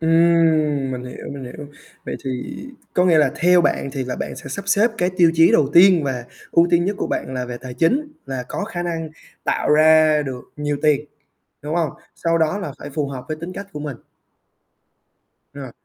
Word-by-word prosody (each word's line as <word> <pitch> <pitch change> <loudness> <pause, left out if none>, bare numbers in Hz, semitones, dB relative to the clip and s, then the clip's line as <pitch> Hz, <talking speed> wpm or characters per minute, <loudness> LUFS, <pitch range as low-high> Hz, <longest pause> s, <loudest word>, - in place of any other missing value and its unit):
Ừm, 160 -4 +3
mình 125 0 -5
hiểu, 125 - -9
mình 140 -2 -7
hiểu. 135 +4 -9 0.4
Vậy - - -4
thì 135 - -2 0.6
có 180 - +3
nghĩa 170 -3 +5
là 150 - +4
theo 180 +1 +4
bạn 150 - 0
thì 135 -3 -3
là 125 - -4
bạn - - -5
sẽ - - -9
sắp 200 - -5
xếp 210 +4 +4
cái 180 +1 +1
tiêu 170 -2 +5
chí 165 +1 +5
đầu 145 -3 +4
tiên 180 -1 +7
và 125 -3 -3 0.3
ưu 170 - +4
tiên 170 0 +3
nhất 200 +1 -1
của - - -1
bạn 130 - -3
là 125 - -2
về 120 -1 -6
tài 125 0 -8
chính, 275 - +1
là 130 -2 -4
có 205 - -3
khả 180 -5 -5
năng 165 -2 -3 0.3
tạo - - 0
ra 155 0 +5
được 130 -3 -6
nhiều 145 -1 -2
tiền, 150 -1 +3 0.6
đúng 150 +2 -3
hông? 160 -5 +1 0.2
Sau 165 0 0
đó 160 +4 +1
là 150 -8 -5
phải 145 - -8
phù 145 0 -2
hợp 130 -2 -7
với 155 - -3
tính 175 +2 -6
cách 200 +2 -7
của 150 - -6
mình. 145 -4 -5 1.6
Rồi, 135 -3 -8
155 Hz, 210 wpm, -21 LUFS, 140-170 Hz, 1.6 s, tiên